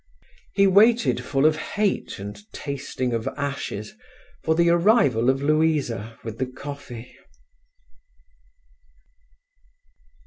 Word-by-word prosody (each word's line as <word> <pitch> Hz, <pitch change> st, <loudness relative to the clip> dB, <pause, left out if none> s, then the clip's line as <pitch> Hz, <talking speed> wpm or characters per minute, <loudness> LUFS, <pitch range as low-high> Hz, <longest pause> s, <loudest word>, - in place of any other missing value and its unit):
He 200 Hz, -, +5 dB
waited, 220 Hz, +5 st, +4 dB
full 135 Hz, 0 st, +1 dB
of 155 Hz, 0 st, +4 dB
hate 205 Hz, +5 st, -2 dB
and 105 Hz, -, -9 dB
tasting 135 Hz, -3 st, -4 dB
of 115 Hz, +2 st, -2 dB
ashes, 140 Hz, -, -4 dB, 0.5 s
for 160 Hz, -, +2 dB
the 170 Hz, +1 st, +4 dB
arrival 170 Hz, -, +4 dB
of 135 Hz, +1 st, +1 dB
Louisa 145 Hz, -8 st, 0 dB
with 115 Hz, -1 st, -7 dB
the 130 Hz, -, 0 dB
coffee. 130 Hz, -2 st, -9 dB
140 Hz, 100 wpm, -24 LUFS, 120-170 Hz, 0.5 s, He